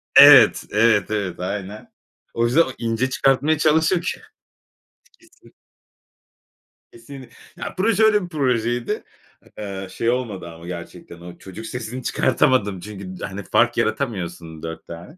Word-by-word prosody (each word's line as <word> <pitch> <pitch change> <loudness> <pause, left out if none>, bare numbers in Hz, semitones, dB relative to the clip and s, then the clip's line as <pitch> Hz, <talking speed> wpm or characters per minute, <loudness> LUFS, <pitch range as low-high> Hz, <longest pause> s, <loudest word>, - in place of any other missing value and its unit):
Evet, - - +8
evet, 105 -2 +3
evet, 95 -5 -3
aynen. 100 +3 -6 0.4
O 115 - +1
yüzden 125 +8 +4
o 130 - 0
ince 115 +2 -1
çıkartmaya 135 +4 +2
çalışır 160 +3 +2
ki - - -4 1.0
Kesin. - - -23 1.4
Kesin. 130 +2 -12 0.3
Ya - - -6
proje 215 +2 +2
öyle 210 -3 +4
bir 175 - -8
projeydi. 120 -6 -1 0.5
Eee, 100 -2 -6
şey 115 - -1
olmadı 110 -9 -3
ama 85 +1 -12
gerçekten 85 -1 -9
o 85 0 -11
çocuk 95 +4 -10
sesini 125 +2 -6
çıkartamadım 120 -6 +1
çünkü 95 -1 -9
d - - -4
hani 95 +1 -7
fark - - +2
yaratamıyorsun 85 - -3
4 80 0 -7
tane. 85 - -11
115 Hz, 135 wpm, -21 LUFS, 95-130 Hz, 1.4 s, Evet